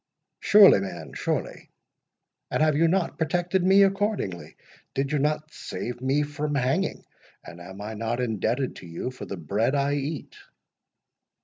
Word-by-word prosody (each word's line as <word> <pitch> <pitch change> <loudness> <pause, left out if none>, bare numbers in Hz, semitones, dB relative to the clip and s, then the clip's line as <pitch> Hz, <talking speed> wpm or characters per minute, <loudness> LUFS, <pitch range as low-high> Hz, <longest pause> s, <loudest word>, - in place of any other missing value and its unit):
"Surely, 205 - +7
man, 95 -1 -6
surely; - - -3 0.8
and - - +1
have 155 -2 +3
you 165 +3 +4
not 180 +1 0
protected 175 +3 0
me 195 +2 +6
accordingly? 195 - -1 0.4
Did 135 +1 -1
you 150 - +1
not 150 +2 -1
save 120 0 -6
me 135 +3 +1
from 145 0 -3
hanging? 140 +9 0 0.4
and 85 - -11
am 95 +3 -10
I 105 +2 -5
not 115 +2 -3
indebted 120 +2 -1
to 90 - -11
you 85 +9 -5
for 130 - -9
the 100 - -5
bread 105 - 0
I 140 0 +1
eat?" 145 +2 -4
140 Hz, 150 wpm, -26 LUFS, 115-160 Hz, 0.8 s, Surely